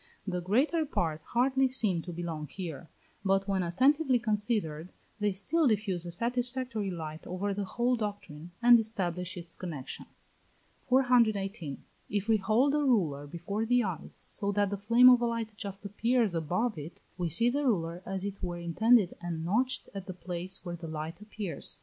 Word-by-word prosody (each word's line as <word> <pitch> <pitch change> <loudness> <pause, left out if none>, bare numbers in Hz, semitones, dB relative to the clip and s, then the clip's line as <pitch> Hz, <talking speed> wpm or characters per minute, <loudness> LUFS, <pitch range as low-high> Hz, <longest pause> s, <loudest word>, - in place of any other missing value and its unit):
The 180 -3 -2
greater 265 - +2
part 165 - -1
hardly 265 +2 +2
seem 215 -9 +1
to 175 - -7
belong 165 -3 -4
here, 170 -2 -7 0.3
but, 195 0 +2
when 195 -1 +1
attentively 260 - +3
considered, 210 -8 -1 0.3
they 210 -1 +2
still 285 - +1
diffuse 195 -6 0
a - - -5
satisfactory 245 +1 -1
light 160 -3 -6
over 195 +3 -2
the 200 0 -3
whole 240 +6 +1
doctrine, 205 -8 -5
and 240 0 +8
establish 180 -5 -2
its 170 -1 -3
connexion. 155 -8 -7 0.8
418. 220 - +2 0.3
If 205 +1 -1
we 225 -1 +4
hold 220 +8 +2
a 300 - +2
ruler 175 - +1
before 175 +7 -3
the 245 +2 +3
eyes 180 -6 -4
so 200 0 -2
that 205 -1 +1
the - - 0
flame 230 +5 +6
of 250 -1 +8
a 240 - +2
light 230 -2 -3
just 200 -1 -6
appears 225 +1 +1
above 180 +7 -1
it, 150 +4 -9 0.2
we 175 -2 -2
see 235 +9 +4
the 290 +3 0
ruler 170 -6 0
as 190 0 -3
it 200 -1 -5
were 175 -1 -3
indented 195 +5 +3
and 165 -2 -4
notched 255 +8 0
at 195 -2 -7
the 185 - -6
place 180 +2 -5
where 175 -1 -4
the 170 -1 -8
light 160 +4 -6
appears. 210 -8 -4
200 Hz, 175 wpm, -30 LUFS, 175-235 Hz, 0.8 s, and